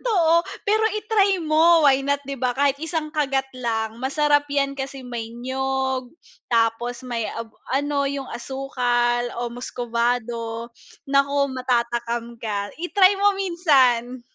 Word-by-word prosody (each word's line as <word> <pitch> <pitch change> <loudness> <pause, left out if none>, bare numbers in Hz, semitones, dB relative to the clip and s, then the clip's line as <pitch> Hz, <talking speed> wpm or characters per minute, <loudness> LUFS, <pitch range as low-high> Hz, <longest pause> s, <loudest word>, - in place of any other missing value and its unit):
totoo, 335 -7 +3 0.2
pero 435 +1 +3 0.2
i-try 400 -4 +2
mo 325 +2 +5
why 270 0 +3
not 285 0 +1
di 275 - -3
ba, 250 0 0
kahit 280 +1 +1
isang 320 0 -3
kagat 275 -3 -1
lang 225 -2 -2
masarap 290 +3 +2
yan 275 -1 0
kasi 270 0 -5
may 235 -3 -6
niyog, 265 +1 -2 0.4
tapos 230 +1 +1
may 230 -2 -2
ab 230 +1 -5 0.2
ano 285 +1 +1
yung 275 -1 -3
asukal 245 -2 -1
o 240 - -2
muscovado, 235 -1 -2 0.4
naku, 280 0 +2
matatakam 235 -1 -1
ka, 205 -3 -3
i-try 375 +3 +3
mo 405 +1 +4
minsan. 270 -10 +2
265 Hz, 130 wpm, -23 LUFS, 240-290 Hz, 0.4 s, mo